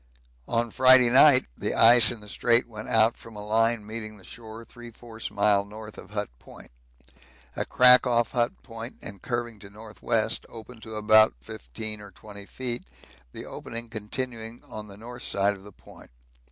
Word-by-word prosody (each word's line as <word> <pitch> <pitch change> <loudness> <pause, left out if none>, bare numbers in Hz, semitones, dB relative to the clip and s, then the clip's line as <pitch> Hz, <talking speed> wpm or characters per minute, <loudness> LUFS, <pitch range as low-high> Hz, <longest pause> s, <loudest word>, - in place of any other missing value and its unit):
On 115 0 -1
Friday 130 -1 +6
night 130 0 +6
the - - -4
ice 115 0 +7
in 120 -3 -5
the 105 - -13
Strait 120 +3 +2
went 110 -2 -9
out 110 +1 +3
from 115 -1 -14
a 105 0 -8
line 115 0 +1
meeting 110 0 -8
the 95 - -17
shore 115 +2 -11
3/4 115 -1 -10
mile 100 0 +2
north 105 +1 -11
of - - -12
Hut 105 0 -4
Point. - - -15 0.8
A - - -3
crack 125 0 +6
off 120 -2 +1
Hut 120 -2 -2
Point 115 0 -9
and 100 -4 -8
curving 120 -3 -4
to 100 - -12
N.W. 110 +1 -3 0.2
opened 115 0 -13
to 110 0 -9
about 110 - +4
15 105 - -7
or 105 - -11
20 100 +1 -12
feet, 125 -2 -5 0.5
the - - -9
opening 115 0 -6
continuing 115 +1 -6
on 105 -1 -10
the 100 -1 -12
north 120 +3 -10
side 100 +1 0
of 95 - -13
the 105 - -13
Point. - - -17
110 Hz, 175 wpm, -25 LUFS, 105-120 Hz, 0.8 s, ice